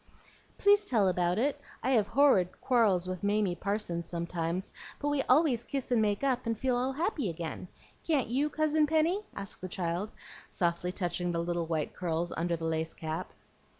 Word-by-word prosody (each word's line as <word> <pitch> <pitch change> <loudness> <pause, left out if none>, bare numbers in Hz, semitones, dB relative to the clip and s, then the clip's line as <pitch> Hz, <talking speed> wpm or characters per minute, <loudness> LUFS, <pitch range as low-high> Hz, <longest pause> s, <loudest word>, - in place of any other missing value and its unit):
"Please 405 +1 +5
tell 225 - +2
about 180 0 +1
it. 285 +5 0 0.2
I 265 - +1
have 220 -6 +3
horrid 230 -9 +3
quarrels 210 -8 +3
with 185 -1 -4
Mamie 205 -2 +1
Parsons 175 -2 -2
sometimes, 170 +1 -3 0.3
but 290 - -1
we 290 -1 +1
always 255 -3 +4
kiss 270 0 -4
and 235 -3 +4
make 205 +2 0
up, 255 -3 0
and 230 -1 0
feel 255 +2 +1
all 255 +2 0
happy 300 - -1
again. 165 +1 -5 0.4
Can't 295 -6 +1
you, 275 +5 +1
Cousin 310 0 +2
Penny?" 320 +6 +2
asked 200 -1 -5
the 185 - -5
child, 175 +3 -2 0.4
softly 175 -1 0
touching 175 -1 -2
the 170 0 -1
little 170 -1 -2
white 160 -2 -1
curls 175 -1 -2
under 170 +1 0
the 165 0 -5
lace 160 0 -1
cap. 160 0 -4
200 Hz, 180 wpm, -30 LUFS, 175-265 Hz, 0.4 s, Please